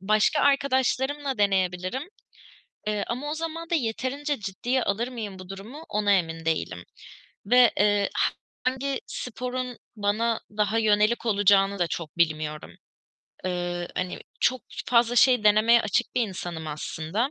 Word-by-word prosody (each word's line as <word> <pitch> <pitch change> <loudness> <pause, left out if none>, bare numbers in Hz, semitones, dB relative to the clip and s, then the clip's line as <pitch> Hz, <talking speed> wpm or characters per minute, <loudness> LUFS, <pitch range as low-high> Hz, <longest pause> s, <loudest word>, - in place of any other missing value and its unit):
Başka 215 +9 +3
arkadaşlarımla 275 0 +1
deneyebilirim. 190 +3 +1 0.8
Eee, 210 -1 0
ama 270 +5 -3
o - - -1
zaman 330 +1 -5
da - - +2
yeterince 275 +2 -1
ciddiye 235 +6 -1
alır 225 +5 0
mıyım 215 -6 -6
bu 185 -1 -10
durumu 220 +11 -9
ona 205 -1 +2
emin 165 -3 0
değilim 90 - -2 0.6
ve, 245 +1 +6
eee, 205 -1 +3 0.5
hangi 265 +1 -1
sporun 250 +1 -5 0.2
bana 220 +3 0 0.2
daha 210 +2 +2
yönelik 215 +2 +2
olacağını 200 -2 +4
da 175 - +2
çok 165 -1 -6
bilmiyorum. 155 -2 0 0.7
Eee, 175 -1 -2
hani, 185 0 -2 0.2
çok 255 -1 +2 0.2
fazla 240 0 +3
şey 250 -3 +5
denemeye 220 +3 +6
açık 215 +4 0
bir - - +4
insanım 175 -4 -6
aslında 160 - -2
215 Hz, 130 wpm, -26 LUFS, 185-255 Hz, 0.8 s, ve